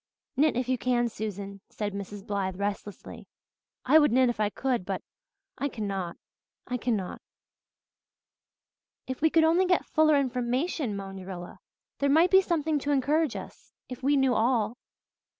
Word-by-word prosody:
"Knit 290 -1 +3
if 250 -1 -1
you 255 -1 0
can, 240 -1 +1
Susan," 200 -2 -6
said 205 -2 -4
Mrs. 200 0 -7
Blythe 195 -3 -2
restlessly. 205 0 -5 0.6
"I 315 - +7
would 295 -5 +4
knit 255 +1 +4
if 240 - -3
I 210 -1 +2
could 250 -1 -1
but 190 0 -4 0.6
I 285 - 0
cannot 195 -7 -4 0.5
I 250 - -2
cannot." 220 -6 -2 1.8
"If 260 +1 -5
we 320 - +5
could 325 +1 +4
only 340 +4 +4
get 360 -1 +2
fuller 310 -1 +4
information," 255 - 0
moaned 195 -1 -7
Rilla. 175 -2 -8 0.4
"There 280 - +2
might 325 +5 +5
be 380 0 +7
something 320 -4 0
to 290 +1 -2
encourage 290 +1 +2
us - - -10 0.2
if 255 0 -7
we 280 +2 +3
knew 265 -2 +3
all." 230 -1 +1
250 Hz, 155 wpm, -28 LUFS, 205-290 Hz, 1.8 s, I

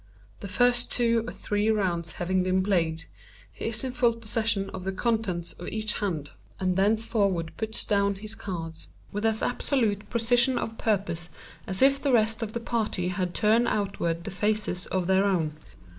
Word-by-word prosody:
The 200 - -6
first 245 +4 +2
two 230 -2 +2
or - - -4
three 205 +1 -1
rounds 175 -6 0
having 185 +1 0
been 185 +1 +1
played, 165 -5 0 0.5
he - - -6
is 225 +2 +1
in 260 - -2
full 245 -2 +3
possession 215 -3 -1
of 185 - -6
the 190 - -1
contents 195 -5 -1
of 175 - -9
each 215 -1 0
hand, 160 -8 -2 0.3
and 185 -1 +1
thenceforward 200 -4 +1
puts 220 0 -2
down 200 -1 +2
his 215 +2 -5
cards 165 -6 -6 0.2
with 210 +2 0
as 220 0 0
absolute 230 -5 0
a - - -19
precision 245 +2 +3
of 225 -1 -4
purpose 185 -5 -1 0.4
as 190 +5 +2
if 275 0 +5
the 280 - +1
rest 225 -1 +2
of 220 -1 -4
the 235 - -2
party 220 -6 -1
had 185 -2 -2
turned 225 +3 +3
outward 190 -5 -1
the 200 - -5
faces 205 -2 0
of 185 -2 -1
their 190 +1 +3
own. 165 -6 +1
205 Hz, 180 wpm, -27 LUFS, 185-225 Hz, 0.5 s, if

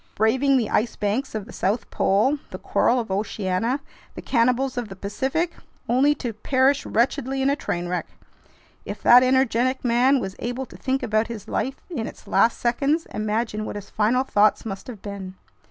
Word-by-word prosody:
Braving 260 +6 +3
the 230 -5 -1
ice 225 +2 +1
banks 220 +5 -2
of 210 -2 -3
the 230 - -12
South 205 +5 -1
Pole, 260 +10 +2
the - - -6
coral 250 - +1
of 225 -5 -4
Oceania, 205 +5 -1 0.3
the - - -6
cannibals 250 +2 +1
of 245 -3 -3
the 195 - -8
Pacific, 265 - -2 0.3
only 275 +5 +3
to 245 -5 -4
perish 265 +5 +1
wretchedly 265 +3 0
in 275 - +3
a - - +1
train 175 -10 -3
wreck! 180 0 -2 0.8
If - - -7
that 245 +1 +8
energetic 255 0 +2
man 250 +3 +4
was 190 -4 -5
able 245 +2 -3
to - - -15
think 265 0 -2
about 215 +1 +1
his 225 -4 -7
life 265 +1 -2
in 265 -11 -4
its - - -11
last 230 - +3
seconds, 280 +7 +1
imagine 215 +1 -1
what - - -5
his 205 -1 -8
final 230 +5 +2
thoughts 210 -4 +2
must 195 -3 -6
have 225 -6 -9
been!" 195 -2 -7
235 Hz, 185 wpm, -23 LUFS, 210-265 Hz, 0.8 s, that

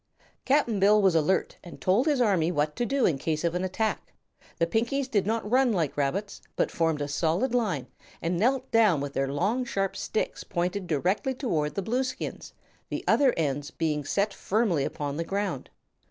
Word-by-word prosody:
Cap'n 265 -6 +2
Bill 205 +2 +5
was 190 -3 +4
alert 165 +4 +1
and 175 - -10
had - - -14
told 205 +10 +2
his 290 -4 +2
army 190 -8 +2
what 150 -2 0
to 240 - -1
do 275 +1 +2
in 145 -6 +1
case 155 +2 -2
of 170 -1 +1
an 180 +1 -1
attack. 215 +4 -2 0.4
The 165 - +2
Pinkies 235 +9 0
did 205 -6 0
not 225 -1 -1
run 255 +2 +3
like 165 -7 -1
rabbits, 180 +9 -2
but - - 0
formed 160 -3 0
a - - -3
solid 165 - 0
line 205 - 0 0.3
and 170 +2 -1
knelt 250 +8 +1
down 215 -9 +4
with 140 0 -4
their 135 0 -1
long, 210 - 0
sharp 195 -5 -2
sticks 220 - -3
pointed 180 +2 -2
directly 185 - 0
toward 155 - -1
the 195 - -2
Blueskins, 250 +5 -3 0.4
the - - -4
other 275 -3 +5
ends 145 -2 -1
being 150 -3 -1
set 200 +8 0
firmly 195 -11 0
upon 145 -1 -4
the 165 - -1
ground. 195 -6 -3
190 Hz, 190 wpm, -27 LUFS, 155-225 Hz, 0.4 s, Bill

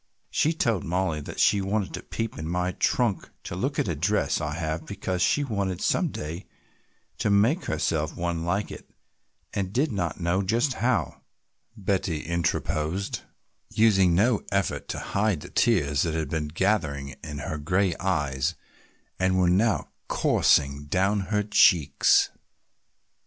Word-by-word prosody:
"She 155 - +2
told 115 - 0
Mollie 90 -3 -1
that - - -8
she 100 - +4
wanted 100 0 -1
to - - -5
peep 115 -1 -4
in 80 +1 -4
my 90 +1 0
trunk 115 +1 0
to - - -6
look 135 +10 -2
at - - +1
a 85 - 0
dress 95 +8 0
I 75 0 -3
have 80 -1 -3
because 95 -2 -3
she 90 +12 +3
wanted 100 -8 -2
some - - +1
day 80 +5 -6 0.7
to - - +1
make 110 - +3
herself 80 0 -1
one 85 -1 -2
like 95 +4 -1
it - - -10 0.6
and 95 -2 -2
did 135 +7 +1
not 90 -5 -2
know 85 +2 +1
just 115 +8 +1
how," 125 0 -1 0.6
Betty 95 -5 -1
interposed, 85 +1 -1 0.5
using 95 -6 +4
no 110 +4 +3
effort 100 0 -1
to - - -4
hide 100 -5 0
the - - -9
tears 75 -11 +2
that 80 -2 0
had 80 -3 -2
been 80 -2 -1
gathering 75 -5 0
in 75 -2 -6
her 75 +1 -4
gray 90 +4 +1
eyes 75 -4 0 0.6
and 95 0 +2
were 90 -1 +3
now 105 +4 +2 0.2
coursing 70 +1 +2
down 95 +6 +1
her 105 -1 +1
cheeks. 80 -9 +4
90 Hz, 150 wpm, -26 LUFS, 80-100 Hz, 0.7 s, she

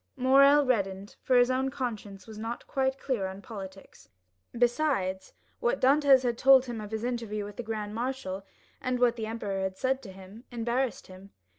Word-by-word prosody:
Morrel 275 +3 +6
reddened, 200 -5 -1
for 255 - +1
his 245 +1 +4
own 260 +1 0
conscience 215 -7 -5
was 220 -1 -10
not 230 +2 -5
quite 265 0 -1
clear 245 -8 -2
on 190 +1 -8
politics; 195 - -10 0.4
besides, 240 -6 0 0.3
what 485 +1 0
Dantès 275 -1 +5
had 240 -2 -1
told 265 -1 +6
him 235 -3 -5
of 210 - -7
his 220 +1 -4
interview 230 -4 -3
with 205 0 -10
the - - -3
grand 215 -2 -5
marshal, 235 -5 -4 0.4
and 255 0 -1
what 245 -1 +3
the 220 -2 -4
emperor 210 -3 -3
had 190 0 -3
said 265 +3 0
to 210 -7 -10
him, 195 +4 -13
embarrassed 240 +1 -2
him. 185 +1 -13
235 Hz, 180 wpm, -28 LUFS, 200-260 Hz, 0.4 s, Morrel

